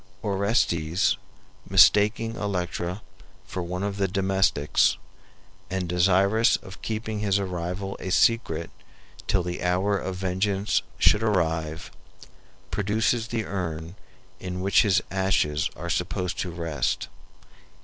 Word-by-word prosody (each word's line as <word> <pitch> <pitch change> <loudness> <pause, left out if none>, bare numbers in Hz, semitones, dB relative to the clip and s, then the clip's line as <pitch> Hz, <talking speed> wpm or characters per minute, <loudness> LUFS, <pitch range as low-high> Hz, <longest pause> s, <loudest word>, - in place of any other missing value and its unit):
Orestes, 100 -4 +1 0.5
mistaking 105 +4 +5
Electra 90 -2 -3 0.4
for 90 - -5
one 90 +2 -4
of 100 -1 -2
the 100 -1 +1
domestics, 95 -6 +2 0.7
and 95 -1 -2
desirous 95 +6 +3
of 95 - -13
keeping 110 -1 -3
his 100 -2 +1
arrival 95 0 -3
a 95 - -5
secret 90 -6 +2 0.6
till 95 - +2
the 90 0 -4
hour 95 +3 +1
of 95 0 -4
vengeance 95 +1 0 0.2
should 105 - +4
arrive, 80 -6 -1 0.8
produces 110 +3 0
the 115 -2 -2
urn 85 -3 -4 0.5
in 90 0 -5
which 100 +1 +4
his 100 -4 +2
ashes 95 -6 +1
are - - -6
supposed 90 0 -2
to 90 - -2
rest. 85 -2 -2
95 Hz, 115 wpm, -25 LUFS, 90-105 Hz, 0.8 s, mistaking